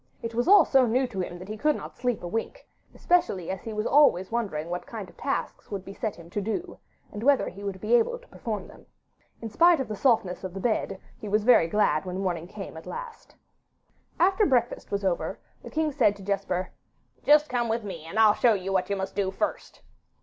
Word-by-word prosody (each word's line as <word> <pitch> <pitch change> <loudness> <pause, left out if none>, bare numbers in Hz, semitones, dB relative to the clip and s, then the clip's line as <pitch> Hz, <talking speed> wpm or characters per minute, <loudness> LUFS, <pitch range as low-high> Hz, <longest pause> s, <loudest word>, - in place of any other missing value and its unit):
It 230 0 -4
was 240 +5 0
all 405 +2 +8
so 265 -3 +4
new 255 +4 +2
to 230 -6 -6
him 175 -1 -4
that 180 +1 -10
he 215 - -5
could 300 +3 +2
not - - -8
sleep 245 -5 -2
a - - -3
wink, 225 - -4 0.3
especially 345 - +1
as 190 - -5
he 225 - -6
was 215 0 -2
always 245 -11 +4
wondering 200 -10 -2
what 180 - -4
kind 215 -5 -7
of - - -17
tasks 275 - -3
would 195 -2 -5
be 195 - -8
set 215 +1 -3
him 170 -1 -13
to 205 - -2
do, 280 - -4 0.3
and 210 - -7
whether 275 +2 +3
he 200 +2 -11
would 195 -2 -4
be 215 +4 -1
able 240 - +3
to - - -20
perform 210 -4 -5
them. - - -16 0.6
In 225 - -4
spite 335 +6 +5
of 265 - -2
the 215 - -4
softness 205 -7 +1
of 185 -1 -6
the - - -4
bed, 200 -3 -1 0.2
he 210 - -6
was 210 +1 +2
very 230 -8 +6
glad 165 -4 +1
when 180 0 -4
morning 175 -3 -2
came 195 -3 -8
at 160 - -11
last. 475 -1 -8 0.8
After 385 +4 +4
breakfast 245 -3 0
was 200 -1 -2
over, 180 -2 -1 0.2
the - - -9
king 315 -1 0
said 230 -8 +3
to 200 - -12
Jesper, 190 -2 -2 0.5
'Just 300 +1 +5
come 240 -3 -1
with 225 0 -1
me, 185 -6 -7
and 165 +6 -7
I'll 220 -2 +7
show 230 0 +3
you 195 0 -3
what 185 0 0
you 200 - 0
must 190 0 -4
do 195 -2 0
first. 305 +11 -4
215 Hz, 230 wpm, -27 LUFS, 190-255 Hz, 0.8 s, all